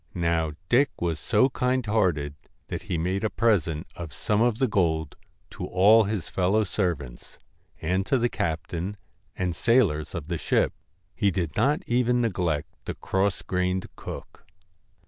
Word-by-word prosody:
Now 85 -2 +1
Dick 135 +6 +4
was 85 -3 -1
so 130 - +3
kind 125 -1 0
hearted, 90 -10 +1 0.4
that - - -3
he 85 - -3
made 90 +5 -1
a 110 - +2
present 90 -10 +1
of 85 -3 -7
some 105 +7 0
of 120 -2 +3
the 130 +1 +2
gold 80 -7 0 0.4
to - - -5
all 105 +4 +6
his 100 -4 -2
fellow 95 +4 +2
servants, 85 - -3 0.4
and 90 +4 0
to 135 - +3
the 120 0 +2
captain 85 +1 -3 0.4
and 90 -2 -1
sailors 100 -10 +2
of 80 -3 -5
the 85 -2 -2
ship. - - +1 0.4
He 100 - +2
did 85 -5 -2
not 145 +3 +2
even 125 0 +2
neglect 90 -10 0 0.2
the - - -4
cross 95 0 0
grained 90 0 0
cook. - - -9
95 Hz, 155 wpm, -26 LUFS, 80-110 Hz, 0.4 s, all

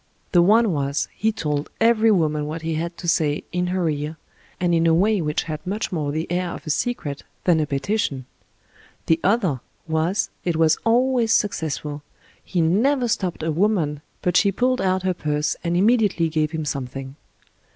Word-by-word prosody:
The 175 - +5
one 215 +4 +4
was, 140 -2 -1
he 220 +1 0
told 150 -8 -2
every 225 0 +4
woman 155 -7 +1
what 160 +2 -5
he 165 0 -1
had 170 +2 -3
to 175 - -7
say 155 -3 +1
in 180 0 -1
her 180 -1 0
ear, 150 +1 -3 0.4
and 175 -1 +1
in 165 0 +3
a 165 - +4
way 205 +3 +2
which 150 -1 -1
had 155 -2 -5
much 205 +3 -2
more 150 -5 -1
the 160 +2 -2
air 180 0 0
of - - -9
a 155 - -1
secret 150 - -2 0.2
than 175 -3 +3
a 150 - 0
petition; 140 - -1 0.8
the 165 0 +2
other 190 - +2 0.3
was, 160 +5 0
it 175 -2 0
was 160 0 +3
always 240 0 +3
successful 150 -8 -1 0.2
— - - -31
he 175 - +3
never 240 - +2
stopped 185 -7 -2
a 160 - 0
woman 165 -5 +1 0.2
but 180 -1 0
she 200 - +4
pulled 255 +5 +1
out 185 0 +1
her 185 0 +1
purse 150 -3 -1
and 170 0 0
immediately 205 -5 +3
gave 155 -1 0
him 160 -1 -4
something. 135 -1 -5
170 Hz, 185 wpm, -22 LUFS, 150-200 Hz, 0.8 s, The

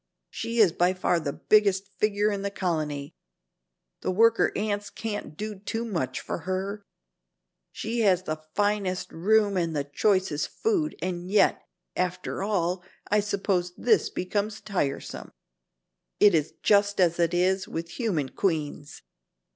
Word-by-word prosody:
She 230 +1 -4
is 210 -7 +6
by 180 +3 +2
far 180 -1 +1
the 145 -3 -2
biggest 200 +2 +2
figure 210 0 +2
in 200 -1 -2
the 200 - -1
colony. 155 -6 -2 0.9
The - - -2
worker 230 +5 +4
ants 205 -1 -2
can't 205 -8 -5
do 210 -2 -5
too 225 +3 -3
much 160 - -2
for - - -4
her. 190 +4 -3 0.9
She 230 +2 -3
has 190 -5 +3
the 155 -3 -3 0.2
finest 205 -3 0
room 205 +3 +2
and 165 -3 0
the 145 - 0
choicest 170 +1 +1
food, 370 -9 -1
and 180 0 -3
yet, 205 +1 +3 0.3
after 180 +1 -2
all, 180 -3 0 0.3
I 210 - +5
suppose 195 -3 -1
this 220 -8 +3
becomes 205 +4 -2
tiresome. 160 -9 -3 0.9
It 205 -2 +7
is 155 -2 0
just 205 -1 +3
as 175 -2 +3
it 170 0 +2
is 185 +2 +2
with 165 +1 -5
human 170 - -1
queens. 150 -5 -2
190 Hz, 140 wpm, -27 LUFS, 170-210 Hz, 0.9 s, It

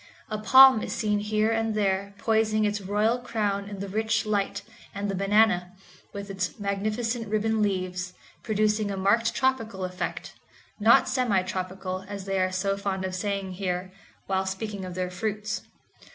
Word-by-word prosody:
A 215 - -2
palm 260 +1 +8
is - - -4
seen 210 -2 0
here 215 +1 +1
and 225 -1 0
there 200 -1 0
poising 220 0 +2
its 205 0 -1
royal 210 +5 +1
crown 205 -4 -2
in 205 - -7
the 200 - -4
rich 220 +3 0
light, 205 -2 -1 0.3
and 200 0 -2
the - - -3
banana, 195 -2 +2 0.4
with 200 0 -6
its 190 +2 -3
magnificent 215 +4 -2
ribbon 215 +1 0
leaves, 185 -2 -1 0.3
producing 215 -1 +1
a 195 - -3
marked 210 +5 +2
tropical 225 -8 0
effect—not 185 +6 0
semi 240 -8 +1
tropical, 185 0 -4
as 200 -1 -6
they 195 -1 -1
are 185 0 +1
so 195 +1 0
fond 195 -1 -2
of 185 - -4
saying 195 0 -2
here, 185 0 -3 0.3
while 190 0 0
speaking 195 0 -4
of 180 -1 -7
their 180 0 -2
fruits. 215 +3 -3
200 Hz, 160 wpm, -26 LUFS, 190-215 Hz, 0.4 s, palm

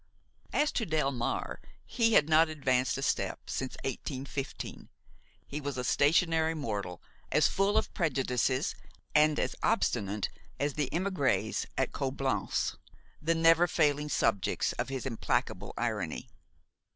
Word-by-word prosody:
As 295 0 +2
to 225 - -1
Delmare, 140 -6 -1 0.3
he 230 -2 +2
had 150 - +6
not 160 +1 +5
advanced 130 -5 +1
a 135 - -3
step - - -1
since 130 -1 -3
1815. 135 +1 -5 0.6
He 150 +2 -5
was 140 -2 -4
a 125 - -2
stationary 160 +4 +3
mortal, 100 - -4 0.3
as - - +5
full 200 +2 +2
of - - 0
prejudices 130 - 0 0.4
and 150 0 +4
as - - -1
obstinate 105 - +1 0.3
as 145 0 0
the 145 -2 -1
émigrés 180 -5 0
at - - +1
Coblentz, - - -1 0.4
the 165 +2 +1
never 165 +1 +5
failing 150 -2 +1
subjects 100 -8 +1
of - - -3
his 135 -1 -4
implacable 110 -5 -1
irony. 105 -9 -2
145 Hz, 125 wpm, -30 LUFS, 125-160 Hz, 0.6 s, had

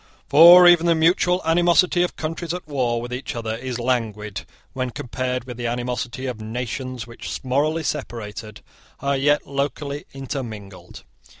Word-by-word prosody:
For 170 +5 +9
even 175 -1 +6
the 170 - +4
mutual 175 +2 +2
animosity 175 +2 +3
of 180 - -1
countries 165 +2 -4
at 180 -3 -8
war 125 -5 -1
with 120 +1 -6
each 125 0 -5
other 110 -1 -3
is 125 0 -5
languid 110 -4 -2 0.3
when 130 -1 -2
compared 125 +1 -4
with 125 -1 -9
the 120 -1 -3
animosity 120 +1 -3
of 125 -4 -5
nations 125 +2 -5
which, 120 0 -7
morally 150 +5 0
separated, 115 -7 -5 0.4
are 140 0 0
yet 145 +2 +2
locally 140 +1 -3
intermingled. 115 -8 -8
130 Hz, 145 wpm, -22 LUFS, 120-155 Hz, 0.4 s, For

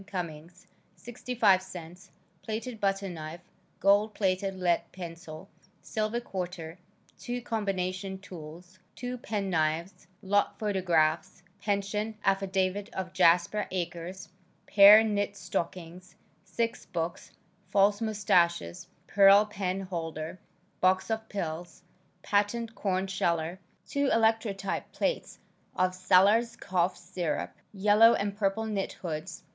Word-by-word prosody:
Cummings; 175 -2 -7 0.3
65 235 -5 +1
cents, 180 -1 -10 0.3
plated 225 +1 -5
butter 195 -1 0
knife, 165 -1 -7 0.4
gold 205 +2 +3
plated 195 -1 0
lead 180 -2 +1
pencil, 170 -2 -9 0.3
silver 215 +2 -2
quarter, 180 -6 -6 0.4
2 245 0 -4
combination 190 -3 -2
tools, 175 -1 -11 0.2
2 250 +2 -5
pen 205 -4 -3
knives, 165 +3 -1 0.2
lot 205 +1 +1
photographs, 175 -6 0 0.2
pension 210 +1 -2
affidavit 195 0 0
of 185 -1 -4
Jasper 175 +3 +3
Acres, 180 +1 -5 0.4
pair 205 +2 +9
knit 205 -2 -1
stockings, 180 0 -5 0.3
6 230 +5 -3
books, 170 0 -4 0.4
false 200 +2 +3
mustaches, 180 -5 +1 0.2
pearl 200 +1 +6
pen 195 -2 -3
holder, 165 -2 -5 0.4
box 185 +4 +2
of 220 0 -3
pills, 175 -2 -5 0.4
patent 220 +3 0
corn 190 -3 -1
sheller, 170 -2 -1 0.3
2 280 -1 0
electrotype 220 -3 +1
plates - - -2 0.4
of 185 0 +1
"Sellers 200 +6 +4
Cough 185 -1 0
Syrup," 170 -5 -3 0.2
yellow 210 +3 +5
and 200 0 -2
purple 205 +1 0
knit 205 -3 -2
hoods. 170 0 -6
190 Hz, 110 wpm, -29 LUFS, 175-210 Hz, 0.4 s, pair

